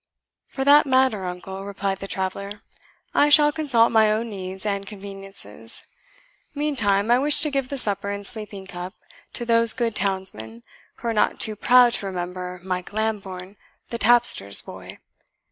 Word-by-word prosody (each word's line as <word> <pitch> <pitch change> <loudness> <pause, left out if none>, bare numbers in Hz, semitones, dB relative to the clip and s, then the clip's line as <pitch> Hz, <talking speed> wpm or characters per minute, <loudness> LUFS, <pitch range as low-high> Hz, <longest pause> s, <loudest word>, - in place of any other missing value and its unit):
"For 270 - -4
that 290 +1 +6
matter, 260 -7 +2
uncle," 190 +2 -6
replied 195 -1 -3
the 195 - -6
traveller, 200 +2 -4 0.5
"I 295 - +4
shall 295 0 +7
consult 275 -7 +2
my 220 -2 +4
own 225 +2 -2
needs 190 0 -7
and 200 -1 -1
conveniences. 195 - -8 0.7
Meantime 230 -8 +1
I 245 - +5
wish 290 +2 +3
to 300 0 +5
give 275 -2 -2
the 280 - -4
supper 200 -4 0
and 200 0 -5
sleeping 205 -3 -7
cup 180 0 -8 0.4
to 240 - -3
those 230 -1 +3
good 235 -3 -2
townsmen 185 - -3 0.3
who 235 - -4
are - - 0
not 210 - +1
too 215 - +1
proud 245 +2 +5
to 200 - -1
remember 180 0 -5
Mike 180 -1 -4
Lambourne, 200 -3 -4 0.3
the 235 - -4
tapster's 230 - +3
boy. - - -11
205 Hz, 160 wpm, -23 LUFS, 190-240 Hz, 0.7 s, shall